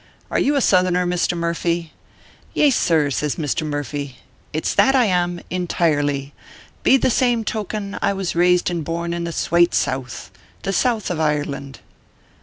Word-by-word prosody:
" -, -, -33 dB
Are -, -, +1 dB
you 290 Hz, +2 st, +2 dB
a 280 Hz, -, +2 dB
Southerner, 180 Hz, -3 st, +3 dB
Mr. 175 Hz, 0 st, 0 dB
Murphy 170 Hz, 0 st, -2 dB, 0.2 s
?" -, -, -27 dB
" -, -, -30 dB
Yaysir," 170 Hz, -, +3 dB
SSLJS 150 Hz, +1 st, -1 dB
Mr. 155 Hz, 0 st, -2 dB
Murphy, 145 Hz, -2 st, -4 dB, 0.2 s
" -, -, -34 dB
it 155 Hz, -, -3 dB
s -, -, +1 dB
that 270 Hz, 0 st, +4 dB
I 255 Hz, -2 st, +5 dB
am, 175 Hz, -3 st, 0 dB
in 180 Hz, -1 st, -2 dB
tirely. 145 Hz, -4 st, 0 dB, 0.5 s
Be 270 Hz, -, +5 dB
the 255 Hz, -, +1 dB
same 240 Hz, -2 st, +2 dB
token, 210 Hz, -1 st, -4 dB
I -, -, +2 dB
was 195 Hz, -2 st, -2 dB
raised 180 Hz, +1 st, +3 dB
and 170 Hz, -2 st, -2 dB
born 170 Hz, +2 st, -3 dB
in 170 Hz, 0 st, -3 dB
the 170 Hz, -, -3 dB
swate 170 Hz, +1 st, +2 dB
South 130 Hz, -1 st, -2 dB, 0.3 s
the 195 Hz, -, -1 dB
South 225 Hz, -1 st, 0 dB
of 165 Hz, -, -3 dB
Ireland." 145 Hz, -3 st, -2 dB
170 Hz, 185 wpm, -21 LUFS, 150-195 Hz, 0.5 s, I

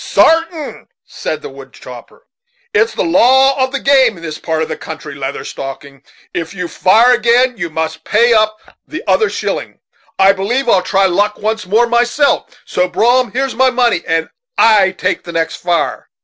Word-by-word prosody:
"Sartain," 325 Hz, -2 st, +1 dB, 0.2 s
said -, -, -5 dB
the -, -, -6 dB
wood -, -, -13 dB
chopper; -, -, -13 dB, 0.5 s
"it's 440 Hz, +1 st, +1 dB
the -, -, -1 dB
law 260 Hz, +9 st, +3 dB
of 260 Hz, -, -2 dB
the 275 Hz, -, -2 dB
game 265 Hz, -7 st, +3 dB
in 165 Hz, -, -13 dB
this 155 Hz, -2 st, -6 dB
part 160 Hz, -1 st, -2 dB
of -, -, -4 dB
the 155 Hz, -, -4 dB
country, 160 Hz, -1 st, -9 dB
Leather 140 Hz, 0 st, -5 dB
Stocking. 135 Hz, 0 st, -8 dB, 0.3 s
If 165 Hz, +2 st, -5 dB
you 180 Hz, -2 st, -4 dB
fire 225 Hz, +9 st, +4 dB
agin 245 Hz, +2 st, +2 dB
you 175 Hz, -4 st, -4 dB
must 160 Hz, 0 st, -4 dB
pay 235 Hz, +3 st, +3 dB
up 215 Hz, -1 st, +2 dB, 0.3 s
the -, -, -7 dB
other 440 Hz, -, +2 dB
shilling. -, -, -4 dB, 0.4 s
I 195 Hz, +1 st, +5 dB
b'lieve 235 Hz, +7 st, -2 dB
I'll 195 Hz, -5 st, +4 dB
try 195 Hz, +1 st, +1 dB
luck 205 Hz, +3 st, 0 dB
once 215 Hz, -1 st, -3 dB
more 220 Hz, +5 st, +3 dB
myself; 240 Hz, +4 st, +1 dB, 0.2 s
so, 180 Hz, -, 0 dB
Brom, 240 Hz, +7 st, +1 dB
here's 265 Hz, +1 st, -2 dB
my 260 Hz, +2 st, +3 dB
money, 240 Hz, -8 st, +1 dB
and 165 Hz, 0 st, 0 dB, 0.3 s
I 210 Hz, -4 st, +5 dB
take 185 Hz, -, -2 dB
the 170 Hz, -, -9 dB
next 165 Hz, -1 st, -2 dB
fire." 175 Hz, -1 st, -2 dB
215 Hz, 180 wpm, -15 LUFS, 170-250 Hz, 0.5 s, I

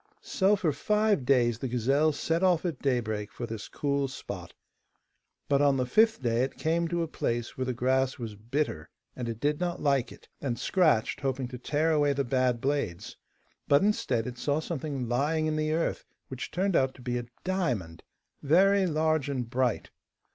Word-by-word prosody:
So 195 Hz, +2 st, +2 dB
for 175 Hz, -7 st, 0 dB
five 210 Hz, -1 st, +1 dB
days 120 Hz, -4 st, +3 dB
the 130 Hz, -, -3 dB
gazelle 135 Hz, +6 st, +2 dB
set 165 Hz, +3 st, -1 dB
off 180 Hz, -2 st, +3 dB
at 165 Hz, -7 st, -2 dB
daybreak 110 Hz, -6 st, -1 dB
for 120 Hz, -, -5 dB
this 115 Hz, -2 st, -6 dB
cool 140 Hz, -1 st, -1 dB
spot, 135 Hz, -, -7 dB, 1.0 s
but 140 Hz, 0 st, +3 dB
on 140 Hz, -2 st, +4 dB
the 130 Hz, -, +1 dB
fifth 220 Hz, -, +3 dB
day 120 Hz, 0 st, +1 dB
it 130 Hz, +1 st, -2 dB
came 165 Hz, +1 st, 0 dB
to 170 Hz, 0 st, -1 dB
a -, -, -3 dB
place 120 Hz, -6 st, -3 dB
where 130 Hz, -, -2 dB
the 130 Hz, -, -1 dB
grass 130 Hz, +2 st, +1 dB
was 115 Hz, -4 st, -6 dB
bitter, 115 Hz, -, -3 dB, 0.3 s
and 120 Hz, -2 st, -4 dB
it 115 Hz, -1 st, -5 dB
did 145 Hz, +2 st, 0 dB
not 175 Hz, -1 st, -2 dB
like 140 Hz, -4 st, +1 dB
it, -, -, -15 dB
and 125 Hz, -4 st, -2 dB
scratched, 155 Hz, -, +2 dB
hoping 135 Hz, -2 st, -2 dB
to 125 Hz, -1 st, -8 dB
tear 150 Hz, +5 st, +1 dB
away 145 Hz, -2 st, +3 dB
the 140 Hz, 0 st, 0 dB
bad 125 Hz, -1 st, +1 dB
blades. 135 Hz, -10 st, -2 dB, 0.5 s
But, 140 Hz, +5 st, +5 dB
instead, 130 Hz, -, +1 dB
it 125 Hz, -1 st, -6 dB
saw 145 Hz, +1 st, 0 dB
something 145 Hz, -5 st, -4 dB
lying 145 Hz, +6 st, +1 dB
in 155 Hz, 0 st, 0 dB
the 155 Hz, 0 st, 0 dB
earth, 165 Hz, +1 st, -1 dB, 0.3 s
which 130 Hz, -1 st, -5 dB
turned 190 Hz, 0 st, 0 dB
out 130 Hz, 0 st, +2 dB
to 125 Hz, -, -14 dB
be 125 Hz, 0 st, -1 dB
a 120 Hz, -, -7 dB, 0.2 s
diamond, 120 Hz, -, -2 dB, 0.4 s
very 190 Hz, +6 st, +4 dB
large 155 Hz, -2 st, +1 dB
and 125 Hz, -4 st, -2 dB
bright. 125 Hz, -1 st, -1 dB
140 Hz, 190 wpm, -28 LUFS, 125-160 Hz, 1.0 s, But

